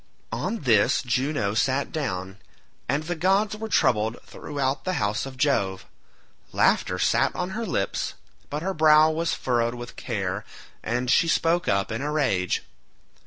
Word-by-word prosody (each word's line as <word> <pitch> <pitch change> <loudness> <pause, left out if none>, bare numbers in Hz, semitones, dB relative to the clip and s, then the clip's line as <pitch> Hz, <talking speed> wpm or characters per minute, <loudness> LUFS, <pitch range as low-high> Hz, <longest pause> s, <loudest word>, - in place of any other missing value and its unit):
On 230 - -3
this 115 -4 +3
Juno 130 -4 0
sat 130 +5 0
down, 95 -10 -4 0.5
and 145 +4 +1
the 175 +3 -2
gods 195 +5 +2
were 220 +1 -6
troubled 110 - +2
throughout 140 -2 -3
the 185 - -1
house 105 +5 -1
of 130 -1 -10
Jove. 100 -9 0 0.7
Laughter - - +2
sat - - +2
on 180 +1 -3
her 225 +3 -3
lips 100 - -2 0.3
but 150 +2 -4
her 190 +1 -1
brow 155 -1 +6
was 165 +1 -1
furrowed 120 -1 0
with 120 0 -8
care, - - -3 0.4
and 125 +2 -1
she 165 - +4
spoke 170 +2 +2
up 100 -1 +1
in 115 +3 -3
a 145 +1 -2
rage. 100 - 0
140 Hz, 155 wpm, -25 LUFS, 115-165 Hz, 0.7 s, brow